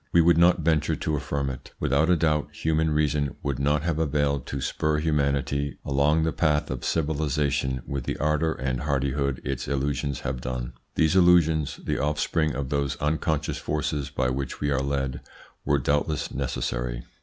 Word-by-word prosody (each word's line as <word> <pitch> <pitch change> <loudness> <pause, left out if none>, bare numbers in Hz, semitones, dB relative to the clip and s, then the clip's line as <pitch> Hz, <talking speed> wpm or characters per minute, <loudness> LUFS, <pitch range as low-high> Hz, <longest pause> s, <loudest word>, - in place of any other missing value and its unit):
We 85 - +5
would 85 0 +5
not 85 0 +5
venture 75 -2 +2
to 75 - -1
affirm 70 -1 -2
it. 65 0 -10
Without 70 +5 +2
a 90 - +5
doubt 75 -2 +1
human 80 0 +1
reason 75 -2 +1
would 70 -3 -2
not 75 +1 +1
have 80 -2 -1
availed 70 -3 0
to 70 - -3
spur 75 +3 0
humanity 70 -2 0
along 70 +3 +2
the 80 - +1
path 75 -4 +1
of 65 -2 -4
civilisation 75 -4 0
with 70 -3 -4
the - - -2
ardour 75 +2 +1
and 65 -1 -2
hardihood 70 -1 0
its 70 -2 -3
illusions 70 0 -1
have 65 -1 -3
done. 60 -1 -4 0.2
These 80 +2 +3
illusions, 85 -4 +4
the - - -1
offspring 75 0 0
of 70 -1 -3
those 70 -2 0
unconscious 75 0 -1
forces 75 -1 -2
by 65 -2 0
which 65 0 -4
we 75 -1 0
are 70 -1 +1
led, 70 -1 -2 0.4
were 70 - +3
doubtless 75 +2 0
necessary. - - -2
70 Hz, 170 wpm, -26 LUFS, 70-75 Hz, 0.4 s, We